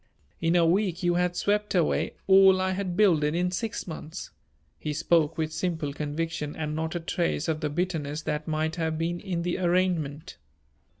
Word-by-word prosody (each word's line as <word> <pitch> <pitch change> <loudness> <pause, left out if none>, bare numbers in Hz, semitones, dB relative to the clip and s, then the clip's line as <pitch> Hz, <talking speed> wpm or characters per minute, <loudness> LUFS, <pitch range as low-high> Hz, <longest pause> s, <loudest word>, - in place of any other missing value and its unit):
In 165 +1 +2
a 170 -1 +5
week 180 0 +1
you 175 0 +3
had 180 0 +1
swept 205 +1 0
away 170 -4 +1
all 190 -1 +7
I 185 0 +1
had 185 -2 -3
builded 165 -7 +3
in 180 +1 +1
six 220 +4 -3
months." 160 -2 -7 0.5
He 150 - -3
spoke 165 0 +2
with 155 -1 -2
simple 160 -3 -2
conviction 150 0 -3
and 150 -1 -3
not 160 +1 -2
a - - 0
trace 170 -2 -1
of 160 -1 0
the 155 -2 -1
bitterness 155 -2 -2
that 150 0 -3
might 155 +1 -1
have 160 -1 -1
been 170 +2 -1
in 175 -3 -3
the 175 +2 -1
arraignment. 175 -3 0
165 Hz, 180 wpm, -27 LUFS, 155-180 Hz, 0.5 s, all